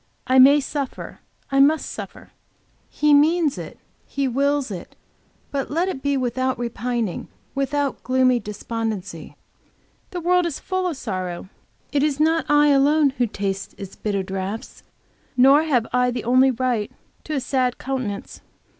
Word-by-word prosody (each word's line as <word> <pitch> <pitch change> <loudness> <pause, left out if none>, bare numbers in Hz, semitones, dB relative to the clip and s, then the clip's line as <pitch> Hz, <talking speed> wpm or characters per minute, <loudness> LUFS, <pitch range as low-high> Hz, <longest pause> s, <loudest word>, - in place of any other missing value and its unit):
I 260 0 +4
may 280 +3 +8
suffer, 280 -1 -5 0.3
I 275 - +2
must 300 +3 +4
suffer, - - -9 0.6
He 300 0 +2
means 305 +1 +3
it, - - -8 0.3
He 275 -1 -1
wills 280 0 0
it, 180 -3 -8 0.6
but 275 -1 -2
let 335 +5 0
it 270 -8 -5
be 280 0 0
without 255 +1 -1
repining, 235 -3 -3 0.3
without 275 0 -1
gloomy 255 -1 +2
despondency. 210 -5 -5 0.7
The 360 - -5
world 355 +1 +2
is 320 - -5
full 370 -1 -2
of 330 -6 -3
sorrow; 185 -6 -5 0.4
it 285 - +1
is 295 -1 0
not 320 +1 +2
I 295 0 +5
alone 285 +1 +4
who 245 - +3
taste 195 -2 -4
its 195 -2 -9
bitter 200 -2 -2
draughts, 190 +3 -5 0.6
nor 270 +4 +7
have 250 -7 +2
I 250 0 +3
the 245 -2 -3
only 255 +3 +4
right 245 -4 -1 0.3
to 310 - -4
a - - +1
sad 255 -1 0
countenance. 255 -7 -4
260 Hz, 150 wpm, -22 LUFS, 230-290 Hz, 0.7 s, may